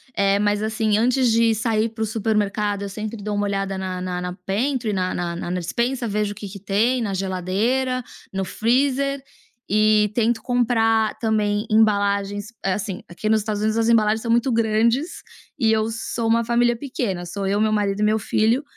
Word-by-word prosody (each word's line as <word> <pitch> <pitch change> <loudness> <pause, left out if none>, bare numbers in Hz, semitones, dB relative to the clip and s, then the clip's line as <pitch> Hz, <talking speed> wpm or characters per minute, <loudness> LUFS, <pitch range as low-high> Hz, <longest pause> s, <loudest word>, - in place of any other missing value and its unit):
Eh, 200 0 +3
mas, 205 0 +1
assim, 220 -1 0
antes 250 +1 +2
de 225 0 +3
sair 220 0 0
para 225 0 -4
o - - +1
supermercado, 210 -2 -1
eu 200 - -4
sempre 215 +3 -5
dou 210 -1 -2
uma 205 0 0
olhada 195 -1 -2
na 185 -1 -4 0.2
na 180 0 -4
pentry 235 +2 -1
na 185 -1 -1
na 175 -1 -3
na 175 - -5
na 180 - -1
despensa, 235 +7 -1
vejo 210 0 -1
o - - -21
que 205 - -7
que 200 +1 -9
tem 220 +6 +1
na 205 -4 -2
geladeira, 205 +8 -1 0.3
no 195 0 -2
freezer, 270 +5 0 0.4
e 215 0 +3
tento 230 -1 +1
comprar 225 -3 +1
também 210 -1 0
embalagens 205 -1 +2 0.2
assim, 195 0 -2
aqui 175 +5 -4
no 220 - +5
Estados 210 -1 -1
Unidos 215 +1 +1
as 225 0 +2
embalagens 220 -1 +3
são 230 - -2
muito 240 +3 +2
grandes, 230 +7 +1 0.3
e 225 -5 +2
eu 220 0 +1
sou 225 +1 -3
uma 230 +1 +3
família 240 +1 +2
pequena, 230 -9 -3
sou 195 +2 -4
eu, 200 +1 +1
meu 215 0 +2
marido 205 -1 0
e - - +3
meu 215 +1 +3
filho, 225 +7 +1
215 Hz, 190 wpm, -22 LUFS, 200-230 Hz, 0.4 s, no